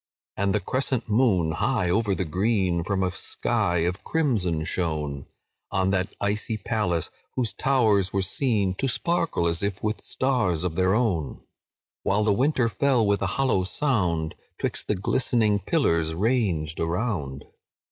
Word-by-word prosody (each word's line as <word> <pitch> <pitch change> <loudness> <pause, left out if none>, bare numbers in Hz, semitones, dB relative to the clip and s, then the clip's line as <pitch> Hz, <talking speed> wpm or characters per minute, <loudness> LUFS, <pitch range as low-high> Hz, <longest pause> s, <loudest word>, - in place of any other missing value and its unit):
"And 100 +1 0
the - - +2
crescent 130 +4 -1
moon, 105 -8 +3
high 90 - 0
over 105 0 +1
the 95 - -2
green, 95 0 0
From 95 +1 -1
a 90 - 0
sky 85 0 0
of 90 +2 -3
crimson 105 - 0
shone, 75 -6 -2 0.4
On 95 -1 +1
that 95 -1 -1
icy 105 +2 -1
palace, 95 -6 -1 0.2
whose 115 -5 0
towers 105 -6 +2
were 95 -1 0
seen 100 -2 +1
To 135 - +1
sparkle 165 - 0
as 85 0 0
if 100 -2 -3
with 105 0 -1
stars 115 -11 0
of 90 -3 -1
their 95 +2 +2
own; 95 - -1 0.6
While 100 +2 +1
the 105 -1 +3
water 130 +2 +2
fell, 125 0 +2
with 100 0 +1
a 95 - +1
hollow 135 -8 +2
sound, 90 - 0 0.2
'Twixt - - -2
the 105 - +1
glistening 105 +1 +1
pillars 85 - +1
ranged 95 - 0
around. 80 - -2
100 Hz, 150 wpm, -25 LUFS, 85-115 Hz, 0.6 s, moon